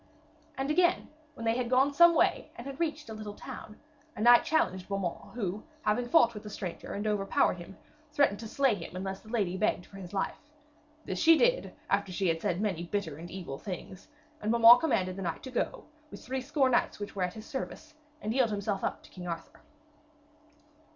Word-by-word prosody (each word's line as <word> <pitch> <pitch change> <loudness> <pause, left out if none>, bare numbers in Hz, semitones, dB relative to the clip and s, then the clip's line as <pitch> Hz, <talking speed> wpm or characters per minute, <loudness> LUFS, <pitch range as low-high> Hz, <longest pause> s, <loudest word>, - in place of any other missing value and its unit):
And 270 +2 -1
again, 350 +2 +2 0.3
when 230 - -7
they 225 0 +2
had 245 -1 -1
gone 265 +3 +3
some 340 +3 +7
way - - +2
and 235 - -9
had 275 0 -7
reached 310 -3 -2
a 220 - -7
little 215 -1 -7
town, 215 - -9 0.4
a - - -6
knight 240 +1 +7
challenged 190 - 0
Beaumains, 195 +1 -4
who, 205 -2 -3 0.2
having 240 +3 +1
fought 240 -7 +5
with 210 - -7
the 210 - -8
stranger 185 -4 -6
and 205 +1 -3
overpowered 200 -3 +1
him, 175 +3 -11 0.3
threatened 285 -9 +2
to 225 - -6
slay 270 +2 +2
him 180 -2 -7
unless 190 +1 -4
the 220 - -16
lady 200 -6 0
begged 185 -3 0
for 195 - -13
his 185 -2 -9
life. 195 -1 -2 0.7
This 185 - -3
she 330 0 +7
did, - - +2
after 190 - 0
she 185 0 0
had 165 0 0
said 175 - 0
many 195 -6 -1
bitter 170 -7 -3
and 170 +2 -9
evil 175 -7 -6
things, 185 -1 -7 0.3
and 215 - 0
Beaumains 235 +1 +9
commanded 185 - 0
the - - -5
knight 170 -3 -3
to 260 - -7
go, 250 - -2 0.2
with - - -11
threescore 265 +1 0
knights 240 - +1
which 205 0 -6
were 195 - -3
in 180 - +1
his 215 +4 -10
service, 305 +2 -6 0.3
and 215 +1 -1
yield 250 -2 +3
himself 200 -1 -2
up - - -2
to - - -17
King 180 -1 -8
Arthur. 165 -1 -7
215 Hz, 205 wpm, -30 LUFS, 190-260 Hz, 0.7 s, Beaumains